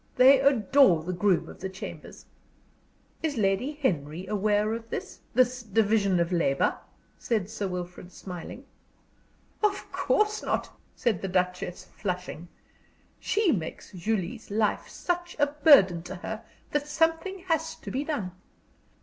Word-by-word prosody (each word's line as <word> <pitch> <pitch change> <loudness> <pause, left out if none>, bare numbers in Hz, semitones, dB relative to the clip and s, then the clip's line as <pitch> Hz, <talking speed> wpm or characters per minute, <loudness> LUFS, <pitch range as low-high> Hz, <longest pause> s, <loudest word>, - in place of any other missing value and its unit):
They 265 +2 +7
adore 270 - +4
the 180 +2 -3
groom 185 0 +2
of - - -11
the 190 - -4
chambers." 190 0 -9 1.0
"Is 305 -5 -1
Lady 205 +7 +1
Henry 175 - -2
aware 210 +1 +1
of 225 0 -6
this - - -5 0.2
this 255 0 +3
division 205 -3 +2
of 170 +1 +1
labor?" 150 -6 +2 0.4
said 215 -4 -1
Sir 210 -2 -2
Wilfrid, 180 0 -6
smiling. 185 +10 -8 1.0
"Of 415 -2 0
course 425 0 +1
not," - - -2 0.2
said 230 -8 0
the 195 - -2
Duchess, 180 -1 -1
flushing. 180 -3 -5 0.7
"She 415 -5 +2
makes 170 - -4
Julie's 205 +3 -3
life 210 +1 0
such 350 0 -3
a 290 - +4
burden 285 - +5
to 185 +2 -7
her 220 +5 -6 0.3
that 295 0 0
something 330 +5 0
has 320 -1 0
to - - -8
be 270 +3 -1
done. 225 - -3
215 Hz, 135 wpm, -27 LUFS, 180-285 Hz, 1.0 s, They